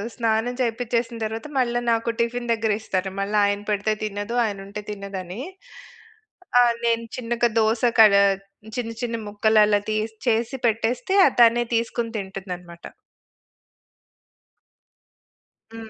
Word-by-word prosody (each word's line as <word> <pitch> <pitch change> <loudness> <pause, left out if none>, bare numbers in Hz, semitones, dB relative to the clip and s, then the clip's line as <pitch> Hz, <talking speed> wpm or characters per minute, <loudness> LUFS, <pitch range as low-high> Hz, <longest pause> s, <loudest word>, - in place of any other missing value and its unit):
స్నానం 225 0 0
చేపించేసిన 235 0 -1
తర్వాత 225 +5 -5
మళ్ళ 240 -2 0 0.2
నాకు 230 0 0
టిఫిన్ 235 +1 -1
దగ్గరిస్తారు. 210 -4 -1
మళ్ళీ 200 +2 -1
ఆయన 200 0 0
పెడితే 210 +1 +1
తినదు. 205 +2 -4
ఆయన 205 -2 -3
ఉంటే 205 +1 -6
తినదని. 200 0 -6 1.2
ఆహ్, 240 -1 +5
నేను 230 0 +1
చిన్నగా 240 -1 0
దోస 220 +2 +1 0.2
కడ 215 -2 +8 0.6
చిన్న 235 -2 -3
చిన్న 235 -1 -2
ముక్కలలా 210 0 +3
తీసి 215 +1 -2
చేసి 235 +3 +1
పెట్టేస్తే 230 - 0
ఆహ్, 270 - -1
తనే 235 +1 +6
తీసుకొని 230 0 -1
తింటుందన్నమాట. 180 -3 -8 2.9
హ్మ్. 225 -1 -9
225 Hz, 115 wpm, -23 LUFS, 205-235 Hz, 2.9 s, కడ